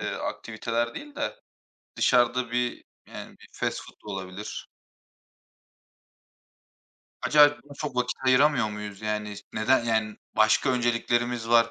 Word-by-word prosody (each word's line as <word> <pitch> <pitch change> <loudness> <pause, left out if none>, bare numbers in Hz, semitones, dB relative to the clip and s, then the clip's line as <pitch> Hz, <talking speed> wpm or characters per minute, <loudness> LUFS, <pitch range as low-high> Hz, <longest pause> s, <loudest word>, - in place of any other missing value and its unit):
eee, - - -2
aktiviteler 115 +2 -3
değil 290 0 -9
de - - -3 0.6
dışarıda 120 -1 +3
bir 120 0 -1 0.2
yani - - -10
bir - - -16
fast - - -2
food - - -15
da 105 - -5
olabilir. 95 +2 -6 2.6
Acaba 150 -1 +7 0.2
buna 145 0 -13
çok 145 -4 -5
vakit 125 0 0
ayıramıyor 130 -3 +4
muyuz 105 -1 -7
yani? 105 -1 -3
S 105 - -10
neden 115 +3 +2
yani 110 -2 0 0.2
başka 110 +5 +4
önceliklerimiz 120 -1 0
var? 115 -1 +5
120 Hz, 130 wpm, -27 LUFS, 110-125 Hz, 2.6 s, Acaba